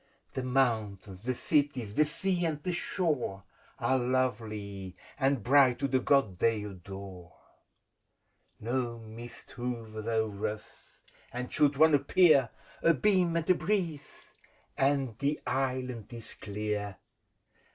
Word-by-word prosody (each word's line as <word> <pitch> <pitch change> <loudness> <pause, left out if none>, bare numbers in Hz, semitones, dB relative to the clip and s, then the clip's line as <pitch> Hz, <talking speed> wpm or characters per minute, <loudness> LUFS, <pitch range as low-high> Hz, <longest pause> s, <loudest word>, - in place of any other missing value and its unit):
The 130 - -2
mountains, 110 -7 0
the 125 +3 -2
cities, 135 -7 0
the 150 - +4
sea 175 +3 -1
and 150 -2 -4
the 180 - -1
shore, 150 - -1 0.3
Are 130 0 +2
lovely 110 -7 -2 0.2
and 135 -2 +2
bright 130 -1 +5
to 140 +2 0
the 130 -1 +2
God 130 -9 +2
they 110 +1 +2
adore: 95 -2 -9 1.2
No 120 0 -2
mist 115 +1 -11
hovers 115 -3 -5
o'er 110 -2 0
us, 105 0 -10 0.3
and 125 +1 -5
should 145 -2 +3
one 160 +1 +6
appear, 145 -2 +5 0.3
A 165 - +5
beam 180 0 +2
and 165 - -2
a - - +8
breeze, 175 -6 -2 0.5
and 135 -4 +1
the 145 +1 0
Island 130 -4 -2
is 115 -2 -9
clear! 105 -1 -4
125 Hz, 125 wpm, -30 LUFS, 110-145 Hz, 1.2 s, a